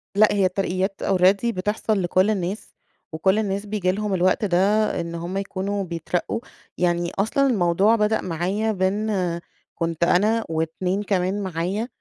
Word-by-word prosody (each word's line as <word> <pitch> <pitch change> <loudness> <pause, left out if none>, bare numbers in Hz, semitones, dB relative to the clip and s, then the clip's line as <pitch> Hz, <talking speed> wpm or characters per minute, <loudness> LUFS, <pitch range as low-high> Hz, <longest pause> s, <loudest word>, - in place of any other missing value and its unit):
لأ، 215 +1 +6
هي 195 -2 +2
الترقيات 190 +1 -1
already 190 +3 +3
بتحصل 210 +2 -1
لكل 185 +3 +2
الناس، 195 0 -3 0.4
وكل 190 +6 +2
الناس 200 -1 -2
بييجي 200 -3 0
لهم 210 0 -2
الوقت 185 +3 +2
ده 175 -3 +1 0.4
إن 170 0 -5
هم 175 +3 -4
يكونوا 200 0 -2
بيترقّوا. 175 +5 -3 0.4
يعني 175 -1 0
أصلًا 275 +7 +2
الموضوع 200 0 +3
بدأ 215 0 +1
معايا 185 +6 -1
بإن 190 -2 -1 0.4
كنت 165 0 -2
أنا 215 +6 +3
و2 170 +5 -1
كمان 195 0 0
معايا، 190 +6 -2
190 Hz, 140 wpm, -23 LUFS, 175-210 Hz, 0.4 s, لأ